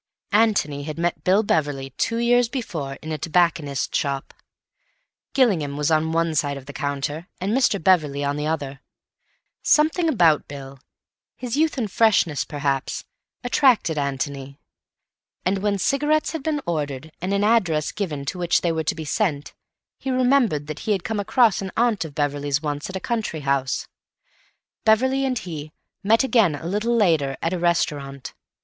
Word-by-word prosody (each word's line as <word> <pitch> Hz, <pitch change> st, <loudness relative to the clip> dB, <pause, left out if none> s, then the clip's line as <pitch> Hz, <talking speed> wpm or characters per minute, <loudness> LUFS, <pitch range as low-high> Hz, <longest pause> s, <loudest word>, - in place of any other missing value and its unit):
Antony 205 Hz, -10 st, +2 dB
had 155 Hz, 0 st, -5 dB
met 170 Hz, +1 st, -1 dB
Bill 195 Hz, +4 st, +3 dB
Beverley 145 Hz, -7 st, -1 dB
two 230 Hz, -, -1 dB
years 240 Hz, 0 st, +3 dB
before 165 Hz, -, -4 dB
in 155 Hz, -, -5 dB
a 155 Hz, -, -3 dB
tobacconist's 160 Hz, -4 st, 0 dB
shop. 140 Hz, -1 st, -2 dB, 1.0 s
Gillingham 170 Hz, -, +2 dB
was 150 Hz, +2 st, 0 dB
on 160 Hz, 0 st, +2 dB
one 165 Hz, 0 st, +1 dB
side 145 Hz, -2 st, 0 dB
of 135 Hz, -, -10 dB
the 145 Hz, -, -9 dB
counter 145 Hz, +4 st, -3 dB
and 195 Hz, +4 st, -1 dB
Mr. 250 Hz, -6 st, +2 dB
Beverley 155 Hz, -6 st, +2 dB
on 140 Hz, 0 st, 0 dB
the 150 Hz, +1 st, -2 dB
other. 140 Hz, -3 st, -3 dB, 0.8 s
Something 320 Hz, +2 st, +3 dB
about 170 Hz, -, +3 dB
Bill, 135 Hz, -1 st, -9 dB, 0.6 s
his 250 Hz, -1 st, -4 dB
youth 310 Hz, 0 st, +1 dB
and 220 Hz, -6 st, -2 dB
freshness, 195 Hz, -10 st, +3 dB
perhaps, 140 Hz, -3 st, -2 dB, 0.4 s
attracted 245 Hz, -, +3 dB
Antony; 140 Hz, 0 st, -4 dB, 0.9 s
and 190 Hz, +2 st, +1 dB
when 205 Hz, 0 st, 0 dB
cigarettes 295 Hz, +9 st, +1 dB
had 320 Hz, -, -4 dB
been 295 Hz, 0 st, -1 dB
ordered, 150 Hz, -2 st, -3 dB
and 185 Hz, +2 st, -2 dB
an 200 Hz, 0 st, +1 dB
address 185 Hz, -9 st, +2 dB
given 155 Hz, -9 st, -4 dB
to 180 Hz, -, -4 dB
which 175 Hz, -1 st, +2 dB
they 170 Hz, -, +1 dB
were 160 Hz, -1 st, -1 dB
to -, -, 0 dB
be 160 Hz, -1 st, -6 dB
sent, 150 Hz, -5 st, -1 dB, 0.5 s
he 270 Hz, -, -4 dB
remembered 255 Hz, -, +2 dB
that 155 Hz, 0 st, -6 dB
he 215 Hz, -, 0 dB
had 190 Hz, -4 st, -2 dB
come 220 Hz, -2 st, -2 dB
across 215 Hz, 0 st, +3 dB
an 190 Hz, -1 st, -5 dB
aunt 230 Hz, -6 st, +2 dB
of 145 Hz, -3 st, -10 dB
Beverley's 145 Hz, -1 st, 0 dB
once 150 Hz, 0 st, -4 dB
at 190 Hz, -, -7 dB
a -, -, -2 dB
country 220 Hz, -8 st, -3 dB
house. 135 Hz, -2 st, -1 dB, 1.0 s
Beverley 260 Hz, +5 st, +3 dB
and 255 Hz, -2 st, 0 dB
he 155 Hz, -6 st, -7 dB, 0.3 s
met 220 Hz, +4 st, +3 dB
again 225 Hz, -, +3 dB
a 155 Hz, -, -9 dB
little 210 Hz, +6 st, 0 dB
later 160 Hz, -, +2 dB
at 165 Hz, -, 0 dB
a 180 Hz, -, -2 dB
restaurant. 145 Hz, -5 st, -1 dB
165 Hz, 170 wpm, -23 LUFS, 145-220 Hz, 1.0 s, Bill